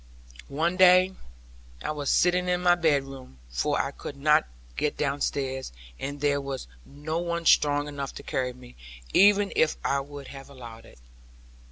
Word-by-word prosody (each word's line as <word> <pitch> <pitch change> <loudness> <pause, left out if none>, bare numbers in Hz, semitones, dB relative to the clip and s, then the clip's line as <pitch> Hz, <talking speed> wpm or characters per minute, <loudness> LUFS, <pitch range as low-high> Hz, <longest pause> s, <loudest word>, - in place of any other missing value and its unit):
One 165 +6 -1
day, 185 0 +6 0.7
I - - -2
was 145 -2 -3
sitting 180 0 +2
in 180 0 0
my 175 -1 +6
bedroom, 135 - -1
for - - 0
I - - -1
could 140 - -9
not 150 - +3 0.3
get 150 - -1
downstairs, 135 - -2 0.3
and 145 +1 -5
there 140 -1 +1
was 135 -1 -5 0.2
no 150 +4 -4
one 170 -1 -3
strong 145 -1 +4
enough 140 -2 -5
to - - -9
carry 125 -1 -2
me, 125 0 -15 0.4
even 205 0 +5
if 155 - +2
I 140 - +1
would 140 0 -9
have 135 0 -11
allowed 120 -4 -11
it. - - -17
145 Hz, 160 wpm, -26 LUFS, 135-170 Hz, 0.7 s, day